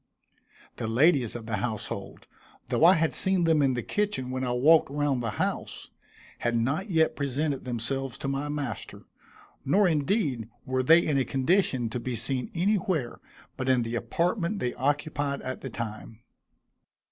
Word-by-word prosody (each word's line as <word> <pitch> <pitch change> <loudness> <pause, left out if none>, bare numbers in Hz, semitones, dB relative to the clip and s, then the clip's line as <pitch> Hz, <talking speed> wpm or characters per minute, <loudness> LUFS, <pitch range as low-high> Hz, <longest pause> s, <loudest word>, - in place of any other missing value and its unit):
The - - -3
ladies 130 0 +3
of 115 -2 -6
the 110 -1 -2
household, 110 +1 -5 0.4
though - - +1
I 180 +3 +8
had 160 0 +1
seen 190 -2 +2
them 160 -2 +3
in 135 -2 +2
the 120 - -3
kitchen 205 -12 -2
when 130 0 -2
I 125 - -1
walked 145 +7 +5
round 145 -2 0
the 115 - -2
house, - - -3 0.5
had 120 0 0
not 140 - -1
yet 160 -3 +2
presented 140 0 -2
themselves 125 +2 -3
to - - -5
my 140 +2 -2
master, 145 -2 -5 0.6
nor 195 +8 +3
indeed 150 - 0 0.2
were 130 0 0
they 165 +6 +5
in 145 -3 +1
a - - +2
condition 135 -2 +1
to 125 - -3
be 125 +1 -3
seen 125 +3 -1
anywhere 180 - 0 0.4
but 130 0 -2
in 125 -2 +3
the 115 0 -5
apartment 170 - -1
they 125 -9 -2
occupied 145 +1 -1
at 130 0 -5
the 135 - -5
time. 110 -1 -7
135 Hz, 165 wpm, -27 LUFS, 125-160 Hz, 0.6 s, I